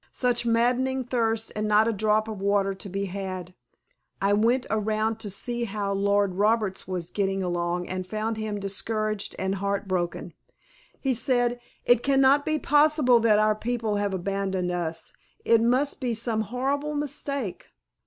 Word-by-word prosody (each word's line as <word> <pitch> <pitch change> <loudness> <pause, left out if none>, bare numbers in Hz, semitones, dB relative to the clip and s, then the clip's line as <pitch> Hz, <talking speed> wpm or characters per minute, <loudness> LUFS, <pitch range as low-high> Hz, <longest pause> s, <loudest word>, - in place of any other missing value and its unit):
Such 245 -2 0
maddening 250 +3 +2
thirst 225 -2 -1
and 215 0 -1
not 210 +1 +4
a 230 - +1
drop 215 +1 +1
of 215 -3 -6
water 200 -1 +2
to 195 +1 -9
be 195 +2 -2
had. 185 -2 -5 0.7
I 200 +1 +2
went 235 +5 +2
around 215 +1 0
to 215 -2 -5
see 235 +5 -2
how 200 -2 -2
Lord 200 -1 +2
Roberts 210 -1 +1
was 180 -2 -4
getting 195 -1 -1
along 175 0 -1
and 185 0 -4
found 215 +2 -2
him 215 -1 -3
discouraged 215 +1 -2
and 190 0 -1
heart 200 0 -1
broken. 175 -2 -2 0.7
He 270 -2 0
said, 245 0 +1 0.3
"It 245 -1 +5
can 275 0 +2
not 275 +2 +4
be 310 0 +2
possible 295 -4 +4
that 220 -2 +4
our 215 0 +4
people 225 -1 -2
have 205 -1 0
abandoned 190 -1 -2
us, 170 -2 -4 0.3
it 230 -1 +5
must 255 +5 +2
be 245 -3 -1
some 225 -1 -1
horrible 275 +7 -2
mistake." 280 -6 -4
215 Hz, 165 wpm, -26 LUFS, 195-240 Hz, 0.7 s, It